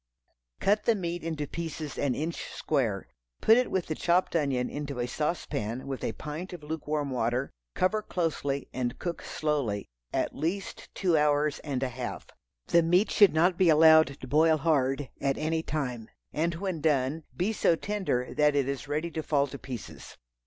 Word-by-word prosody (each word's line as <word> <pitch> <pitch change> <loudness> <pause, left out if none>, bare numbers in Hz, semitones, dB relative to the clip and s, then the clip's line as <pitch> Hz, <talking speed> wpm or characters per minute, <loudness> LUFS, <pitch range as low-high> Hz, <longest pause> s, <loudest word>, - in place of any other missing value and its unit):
Cut 205 +2 +2
the 230 - +4
meat 175 -3 -3
into 160 -3 -2
pieces 160 -1 -5
an 140 -3 +1
inch 160 +3 -3
square. 115 - -1 0.3
Put 225 - +6
it 250 +1 +2
with 185 -2 0
the 155 - -2
chopped 175 +3 +1
onion 135 -6 +1
into 145 -2 -5
a 120 - 0
saucepan 125 -5 -2
with 135 -2 -5
a 115 - -1
pint 155 - -6
of 170 -4 -8
lukewarm 150 -2 -2
water; 125 +2 0 0.2
cover 210 +4 +2
closely 150 -7 -2
and 125 -2 -2
cook 175 -1 -4
slowly, 140 -10 -1 0.3
at - - -1
least 190 +5 -3
two 180 -4 +2
hours 150 -1 +2
and 135 -3 -3
a 130 - 0
half. 125 0 -5 0.4
The 170 - +4
meat 180 +5 +3
should 200 -6 +6
not 175 +2 +3
be 185 -3 +5
allowed 160 -2 +6
to 130 - -8
boil 155 +3 +4
hard 140 -3 +1
at 135 -1 +1
any 160 +1 0
time, 125 -8 -3 0.2
and 165 +2 0
when 180 -3 -3
done, 150 0 +1
be 195 +5 +1
so 170 - +3
tender 185 -11 -2
that 150 -1 +3
it 140 -2 +2
is 140 0 -3
ready 155 +4 -2
to 160 - -3
fall 145 -2 +2
to 140 0 -8
pieces. 125 -5 -8
150 Hz, 180 wpm, -28 LUFS, 135-170 Hz, 0.4 s, Put